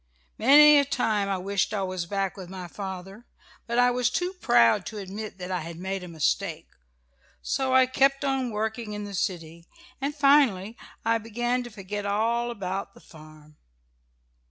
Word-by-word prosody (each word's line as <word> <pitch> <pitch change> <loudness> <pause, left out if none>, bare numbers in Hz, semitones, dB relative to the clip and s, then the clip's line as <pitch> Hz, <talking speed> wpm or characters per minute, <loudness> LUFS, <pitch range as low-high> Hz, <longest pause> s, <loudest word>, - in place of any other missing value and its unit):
Many 295 +4 +8
a - - +3
time 215 -7 0
I 195 - 0
wished 200 +3 -1
I 195 - -1
was 185 -2 -4
back 195 0 -2
with 185 -3 -9
my 185 -1 -7
father, 195 +4 -8 0.4
but 235 0 -2
I 245 0 +5
was 245 0 +1
too 360 +8 -2
proud 210 - +3
to 220 - -7
admit 200 +1 -7
that 180 0 -6
I 180 - -1
had 165 0 -8
made 190 +1 -4
a - - -8
mistake. 160 -3 -2 0.7
So 265 -1 0
I 260 0 +7
kept 275 +2 +2
on 270 -2 0
working 220 0 -3
in 210 0 -5
the 205 -1 -7
city, 170 -3 -4 0.3
and 285 +2 -2
finally 275 -8 +3 0.3
I 230 0 +2
began 240 +3 -2
to - - -8
forget 205 -1 -6
all 230 +4 0
about 195 -3 -5
the - - -15
farm. 155 -1 -16
210 Hz, 175 wpm, -26 LUFS, 185-245 Hz, 0.7 s, Many